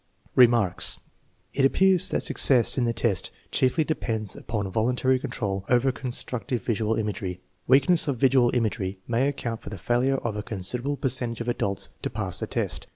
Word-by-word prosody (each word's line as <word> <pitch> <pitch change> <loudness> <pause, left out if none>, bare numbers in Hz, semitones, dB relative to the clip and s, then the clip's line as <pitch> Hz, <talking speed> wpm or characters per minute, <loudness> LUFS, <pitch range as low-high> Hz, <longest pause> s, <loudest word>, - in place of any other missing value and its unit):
Remarks. 120 -7 +4 0.5
It 140 - 0
appears 185 +6 +4
that - - -1
success 125 -4 +5
in 125 - 0
the 115 - +1
test 115 -5 -1 0.2
chiefly 130 +5 +2
depends 110 -9 -3
upon 105 -4 -4
voluntary 125 +4 +1
control 105 -7 -3
over 125 +2 +3
constructive 125 -2 -4
visual 110 -1 -1
imagery. 105 -4 -4 0.3
Weakness 140 +7 +4
of 140 -3 -1
visual 130 -1 +3
imagery 105 -5 -1
may 120 +3 +1
account 120 -5 -4
for - - -9
the 105 - -7
failure 125 +7 0
of 115 -5 -4
a 105 - -3
considerable 120 +7 -2
percentage 120 -3 -2
of 120 - -5
adults 100 -5 0
to - - -3
pass - - -3
the - - -4
test. - - -3
120 Hz, 165 wpm, -25 LUFS, 110-130 Hz, 0.5 s, success